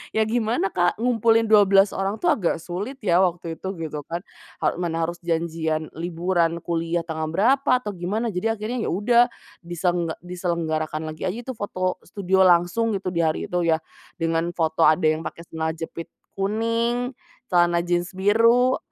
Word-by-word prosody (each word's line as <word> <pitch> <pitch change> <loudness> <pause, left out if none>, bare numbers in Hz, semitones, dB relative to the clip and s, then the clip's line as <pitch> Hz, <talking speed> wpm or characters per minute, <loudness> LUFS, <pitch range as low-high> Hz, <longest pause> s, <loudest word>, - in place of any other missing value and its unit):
Ya 220 - +4
gimana 220 -2 0
Kak, 175 -1 +1
ngumpulin 225 -2 +3
12 200 -2 +6
orang 195 +2 -2
tuh 350 -2 +3
agak 180 - 0
sulit 200 +11 -5
ya 175 -2 +3
waktu 170 -3 0
itu, 190 - -6
gitu 155 -2 -5
kan, 170 +1 -4 0.4
ha - - +1
mana 165 -2 -1
harus 170 +1 -3
janjian 160 -2 -1
liburan 170 0 0
kuliah 170 0 -1
tanggal 160 -1 -4
berapa, 265 - +2
atau 210 - -3
gimana 205 +6 -2
jadi 225 +5 -1
akhirnya 225 +3 -3
ya - - -1
udah, 235 +5 +4 0.4
disengga 175 -1 -1
diselenggarakan 160 -3 -2
lagi 155 +3 -4
aja 190 +6 -3
itu 260 - -5
foto 185 -2 -2
studio 190 -1 +2
langsung 180 +6 +3
gitu, 190 -1 -3
di 170 - -2
hari 155 -1 0
itu, 180 - +1
ya, 160 0 +3 0.4
dengan 165 +1 0
foto 160 -1 +2
ada 155 +3 +3
yang 155 +1 0
pake 170 - -7
celana 160 0 -2
jepit 165 0 -7 0.3
kuning, 230 +5 0 0.4
celana 175 -1 +3
jeans 175 +1 -1
biru, 230 +6 +4
180 Hz, 165 wpm, -23 LUFS, 165-215 Hz, 0.4 s, 12